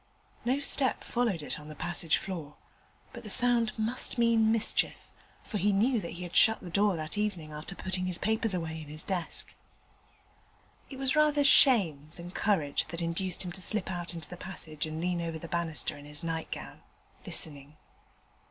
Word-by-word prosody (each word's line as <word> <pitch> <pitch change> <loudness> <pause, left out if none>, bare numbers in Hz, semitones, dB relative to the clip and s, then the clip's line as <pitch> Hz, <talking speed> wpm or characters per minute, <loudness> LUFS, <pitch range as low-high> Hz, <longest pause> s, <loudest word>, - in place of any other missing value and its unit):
No 255 +4 +1
step 275 -2 +3
followed 230 -10 -1
it - - -5
on 150 - -12
the 155 - -9
passage 170 -1 0
floor, 165 -6 -6 0.6
but - - -8
the - - -8
sound 240 -3 +5
must 225 +4 +1
mean 230 -2 +4
mischief, 225 -1 0 0.3
for 210 - -4
he 205 +2 +2
knew 225 +4 +2
that 170 - -6
he 175 +1 -7
had 175 - -8
shut 220 0 +6
the 175 - -9
door 200 +1 +2
that 155 +5 -4
evening 180 -8 -2
after 150 +6 -6
putting 185 -1 -3
his 180 -2 +1
papers 220 +1 0
away 160 -2 -4
in 155 - -10
his 155 +3 -5
desk. 180 -4 -3 1.4
It 270 - -8
was 265 +1 +1
rather 300 -1 +4
shame 195 - +5
than 175 +1 -9
courage 180 -8 0
that 170 +1 -6
induced 175 +3 0
him 175 - -4
to 185 - -1
slip 190 +1 0
out 175 -1 -2
into 165 -3 -5
the 180 - -9
passage 160 -5 -6
and 155 0 -5
lean 175 0 -1
over 165 -1 -3
the 170 - -8
banister 170 -2 -2
in 145 - -12
his 150 +2 -3
nightgown, 165 -1 -5 0.5
listening. 145 -1 -2
180 Hz, 185 wpm, -30 LUFS, 160-220 Hz, 1.4 s, shut